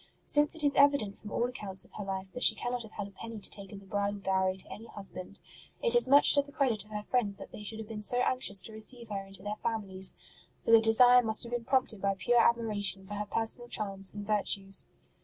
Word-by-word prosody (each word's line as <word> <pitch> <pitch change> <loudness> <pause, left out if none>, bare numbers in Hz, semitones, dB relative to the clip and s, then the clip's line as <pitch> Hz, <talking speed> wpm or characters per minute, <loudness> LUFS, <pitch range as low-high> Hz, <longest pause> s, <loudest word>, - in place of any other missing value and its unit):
Since 295 +2 +3
it 320 - 0
is 285 -1 +2
evident 280 -8 +3
from 210 - -10
all 235 - 0
accounts 205 -6 -6
of - - -23
her 210 - -6
life 190 -1 -6
that 250 - -8
she 220 - +6
cannot 245 +2 -4
have 220 -2 -12
had 205 - -6
a - - -15
penny 225 +3 -9
to 205 - -3
take 195 -2 -5
as 200 -1 -8
a - - -18
bridal 200 +1 -2
dowry 190 -1 0
to 190 - -8
any 225 +2 -11
husband, 195 -1 -5 0.4
it 475 - +2
is 480 - +5
much 285 +2 +6
to 285 - +4
the 285 0 -15
credit 255 -7 0
of 210 - -22
her 210 -1 -6
friends 210 -5 -1
that - - -11
they - - -10
should 215 +1 -7
have 220 -1 -8
been 215 -1 -7
so 245 +4 +1
anxious 250 -6 +1
to 220 - -6
receive 230 +2 0
her 200 -2 -4
into 195 -1 -6
their 210 +1 -5
families, 195 -5 0 0.5
for - - +1
the 225 -1 +7
desire 245 +3 +6
must 220 0 +2
have 235 - -10
been 240 -1 -4
prompted 250 -6 0
by 195 0 0
pure 235 +7 +2
admiration 210 -5 0
for 205 - -9
her 205 0 -4
personal 225 +3 -3
charms 195 -2 +3
and 205 0 -8
virtues. 200 -2 +1
215 Hz, 250 wpm, -30 LUFS, 195-240 Hz, 0.5 s, the